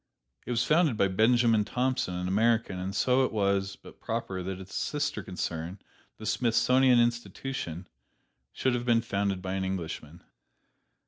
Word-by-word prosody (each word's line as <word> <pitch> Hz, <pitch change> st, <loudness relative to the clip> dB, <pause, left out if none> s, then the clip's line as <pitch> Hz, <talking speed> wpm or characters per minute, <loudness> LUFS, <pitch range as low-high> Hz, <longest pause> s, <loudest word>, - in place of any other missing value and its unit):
It -, -, -6 dB
was 120 Hz, -1 st, +1 dB
founded 155 Hz, -6 st, +3 dB
by 100 Hz, -, +3 dB
Benjamin 115 Hz, +2 st, +3 dB
Thompson, 125 Hz, -3 st, -1 dB
an 90 Hz, 0 st, -3 dB
American, 110 Hz, 0 st, +1 dB
and 95 Hz, +1 st, -4 dB
so 130 Hz, +4 st, +3 dB
it -, -, 0 dB
was 100 Hz, -2 st, 0 dB
but -, -, -15 dB
proper 95 Hz, -1 st, -3 dB
that 95 Hz, +1 st, -5 dB
its 95 Hz, 0 st, -11 dB
sister 145 Hz, -7 st, -2 dB
concern, 90 Hz, -2 st, -4 dB, 0.4 s
the 110 Hz, -, -9 dB
Smithsonian 120 Hz, +3 st, +3 dB
Institution, 120 Hz, -6 st, -2 dB, 0.6 s
should 130 Hz, -, 0 dB
have 120 Hz, -1 st, -1 dB
been 120 Hz, -2 st, +3 dB
founded 100 Hz, -4 st, -1 dB
by 95 Hz, 0 st, -3 dB
an 95 Hz, 0 st, -1 dB
Englishman. 85 Hz, -3 st, -5 dB
105 Hz, 150 wpm, -29 LUFS, 95-120 Hz, 0.6 s, founded